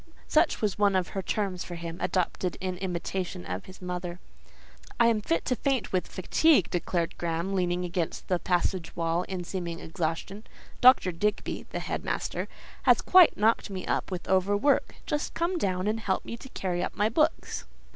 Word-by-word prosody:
(such 315 +1 +3
was 205 -1 0
one 200 -2 +4
of 185 -2 +1
her 195 - -3
terms 190 -2 -2
for 175 - -7
him, 170 +1 -6
adopted 180 0 -1
in 185 -1 -2
imitation 180 - -3
of 90 +2 -4
his 185 0 -12
mother.) 180 -1 -4 0.8
"I 235 - +6
am 220 -2 +1
fit 165 -4 0
to 250 - +1
faint 265 -4 -1
with 185 - +1
fatigue," 270 - +3
declared 170 -1 -1
Graham, 170 +3 -1
leaning 180 -1 0
against 175 -1 -3
the 180 -2 +1
passage 180 0 0
wall 165 +1 0
in 185 -2 -3
seeming 170 -2 -4
exhaustion. 165 +6 -4 0.4
"Dr. 250 -7 +7
Digby" 205 +5 -2
(the - - -4
headmaster) - - -3 0.3
"has - - +5
quite 365 -3 +6
knocked 220 +1 +2
me 190 -2 -5
up - - -1
with 180 -2 -5
overwork. 205 +8 +2
Just 295 0 -2
come 345 +2 0
down 185 - 0
and 215 +2 0
help 190 -4 -1
me - - -5
to 265 +3 -11
carry 180 -6 -2
up - - -4
my 210 - +2
books." 305 +8 0
185 Hz, 175 wpm, -28 LUFS, 175-210 Hz, 0.8 s, Dr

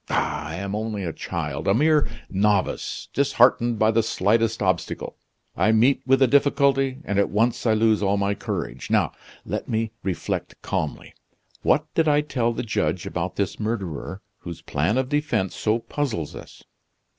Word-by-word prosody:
Ah! - - -1
I 80 - -5
am 100 +2 -4
only 105 -1 -3
a 85 -3 -3
child, 75 -4 -4
a 95 - +4
mere 150 +3 +3 0.2
novice, 100 0 0
disheartened 120 -4 +3
by 110 +1 +4
the 115 +1 +3
slightest 110 +1 +1
obstacle. - - -2 0.4
I 95 +5 +3
meet 120 +5 +4
with 135 +1 +5
a - - +5
difficulty, 140 -1 +2
and 100 0 0
at 100 - +2
once 115 +3 +1
I 110 - +4
lose 110 -1 +3
all 100 0 +2
my 100 0 +1
courage. - - -5
Now, - - +2 0.3
let - - -4
me 110 -1 -1
reflect 95 -3 -3
calmly. 75 - -3 0.5
What 150 - +2
did 165 -1 +2
I 150 0 +4
tell 125 -5 0
the 120 - -3
judge 100 -5 -1
about 90 +1 -3
this 100 -2 -2
murderer, 100 -4 -4 0.2
whose 85 -2 -8
plan 80 - 0
of 130 -1 +1
defense 135 -10 0
so 110 +1 +1
puzzles 115 - -3
us? - - -12
110 Hz, 170 wpm, -24 LUFS, 95-130 Hz, 0.5 s, with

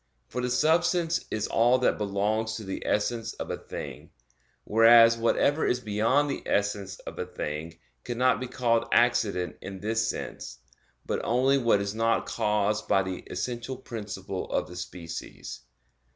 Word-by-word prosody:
For 125 - -3
the 125 - -1
substance 165 +5 +2
is 110 -1 -1
all 120 +3 +3
that 125 - +1
belongs 105 +2 0
to 110 - -6
the 95 -1 -5
essence 115 +2 0
of - - -6
a - - -2
thing; - - -8 0.5
whereas 115 +1 +7
whatever 130 +6 +2
is 125 - +1
beyond 115 +6 +1
the 140 - -3
essence 100 -2 -1
of - - -9
a - - -1
thing 80 +2 -5 0.3
cannot 125 +1 +1
be 130 - -4
called 115 -2 +1
accident 110 -7 +2
in 95 0 -7
this 110 +2 0
sense; 65 - -6 0.5
but - - -2
only 130 +3 +3
what 115 -5 +3
is 100 0 -3
not 115 +1 +1
caused 105 0 0
by 95 - +3
the 95 -1 -4
essential 120 +6 -4
principle 105 -6 -6
of - - 0
the 90 - -11
species. 90 -1 -7
115 Hz, 155 wpm, -27 LUFS, 100-125 Hz, 0.5 s, whereas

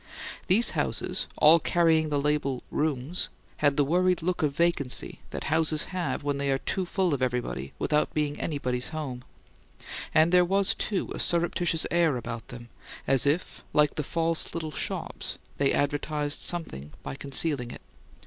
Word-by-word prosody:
These 210 +6 +4
houses, - - -1
all 160 +2 +7
carrying 160 -1 +3
the 145 -1 +1
label. 140 -3 0
"Rooms," 150 +2 -1 0.3
had 145 -1 +2
the 145 - +5
worried 180 +3 +2
look 180 +1 0
of 145 -3 0
vacancy 170 -6 0
that - - -5
houses 155 0 +1
have 180 -5 -2
when 145 -1 -1
they 140 0 0
are 135 - +2
too 185 +7 -2
full 180 -2 0
of 135 - -1
everybody 120 - -2
without 150 0 +1
being 150 -1 -1
anybody's 125 -5 -2
home; 135 -6 -5 0.9
and 160 +2 +4
there 180 0 +6
was, 195 +2 +2
too, 200 -3 -2
a - - -6
surreptitious 170 -1 +1
air 170 -6 +3
about 115 -1 -6
them, 120 -1 -10 0.4
as 135 +1 +3
if, 155 +5 -1
like 150 0 +4
the - - -2
false 165 +3 -1
little 160 -2 -3
shops, - - -4 0.2
they 140 -1 +3
advertised 145 +1 0
something 75 - -2
by - - -5
concealing 140 -2 -1
it. - - -9
150 Hz, 160 wpm, -27 LUFS, 140-170 Hz, 0.9 s, all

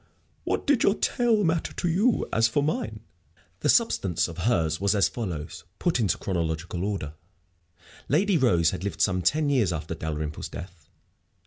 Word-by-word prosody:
"What - - -1
did 285 -4 +3
your 200 - +4
tale 230 -3 +1
matter 165 -2 0
to - - -2
you? 205 +8 +2
As 115 0 +4
for 140 +5 0
mine 110 -8 -2 0.3
" - - -35
The - - 0
substance 90 -4 +2
of 85 0 -9
hers 80 -6 0
was 100 +1 +2
as 100 -5 +4
follows, 85 -12 -5
put 175 -7 0
into 100 -7 +1
chronological 85 -1 -3
order: 95 -8 -3 1.0
Lady 190 +7 +3
Rose 90 - +3
had 85 - -5
lived 100 -5 -3
some 95 -2 +2
ten 150 - +2
years 115 -10 +2
after 80 -1 -4
Dalrymple's 75 -2 -4
death. 85 -3 -10
100 Hz, 170 wpm, -26 LUFS, -, 1.0 s, your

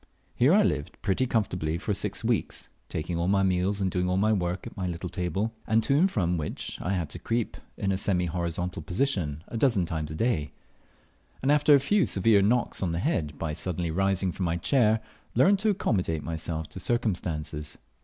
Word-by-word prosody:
Here 130 +5 +4
I 205 +3 +6
lived 75 - -1
pretty 105 +6 +1
comfortably 90 -9 0
for 100 +4 -2
six 95 - -3
weeks, - - -1 0.2
taking 85 +2 -3
all 85 - 0
my 100 0 +3
meals 95 +2 +1
and 95 -2 0
doing 90 0 0
all 90 - +1
my 110 +3 +3
work 90 -2 -1
at 120 - -8
my 95 -4 -2
little 90 +1 -4
table, 90 +5 -2 0.2
to 115 +5 +3
and 180 +7 +4
from 90 - 0
which 75 -2 -5
I 95 - -1
had 90 -4 -1
to - - -7
creep 115 -1 -1 0.2
in 100 - 0
a 95 - +1
semi 90 -3 +1
horizontal 85 0 -3
position 85 - -1
a 115 - -4
dozen 115 -8 +3
times 80 -2 -3
a 80 - -6
day; 80 -7 0 0.9
and, 135 - +3
after 150 0 +6
a - - +5
few 200 +10 +2
severe 100 +1 +4
knocks 120 +5 +1
on 90 -4 0
the - - -1
head 85 - -1
by 80 -2 -3
suddenly 85 0 -3
rising 95 +1 +1
from 90 - -3
my 85 0 0
chair, 110 +3 +3 0.3
learnt 190 - +5
to 215 +2 +1
accommodate 90 - 0
myself 80 -1 -3
to - - -8
circumstances. 85 -9 -2
95 Hz, 200 wpm, -27 LUFS, 85-115 Hz, 0.9 s, I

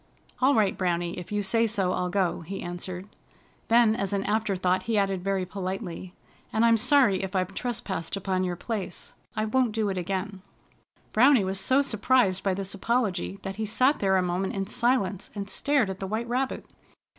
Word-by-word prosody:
"All 275 +2 +5
right, 210 -3 +2
Browny, 175 -2 -1
if 180 +2 -9
you 205 0 0
say 225 +4 +2
so, 195 -4 0
I'll 180 - -1
go," 180 -2 0
he 195 +4 -6
answered. 180 +2 -6 0.6
Then, 230 -1 +5
as 195 -2 -2
an 195 -1 0
after 215 -1 0
thought, 185 0 +1
he 225 - +2
added 195 -2 0
very 195 -1 0
politely: 185 -1 -5 0.4
"And 220 +1 +3
I'm 230 -1 +5
sorry 245 -4 +4
if 190 0 -5
I've 185 0 0
trespassed 205 -7 -3
upon 185 -1 -1
your 180 -1 -1
place. 195 -1 -5 0.2
I 215 - 0
won't 240 0 +1
do 215 -2 0
it 190 -1 -2
again." 190 +2 -3 0.7
Browny 255 0 +6
was 190 0 -1
so 260 +8 +3
surprised 215 -5 +2
by 195 -2 0
this 195 0 -4
apology 200 -3 -1
that 195 0 -5
he 220 - -2
sat 255 +7 +2
there 190 -1 +3
a 185 - +2
moment 180 +3 -1
in 195 0 -1
silence 235 -4 0
and 200 -1 -4
stared 280 +1 +1
at 190 0 -5
the 195 - -4
White 220 +4 -2
Rabbit. 255 +2 -2
195 Hz, 190 wpm, -27 LUFS, 185-225 Hz, 0.7 s, Browny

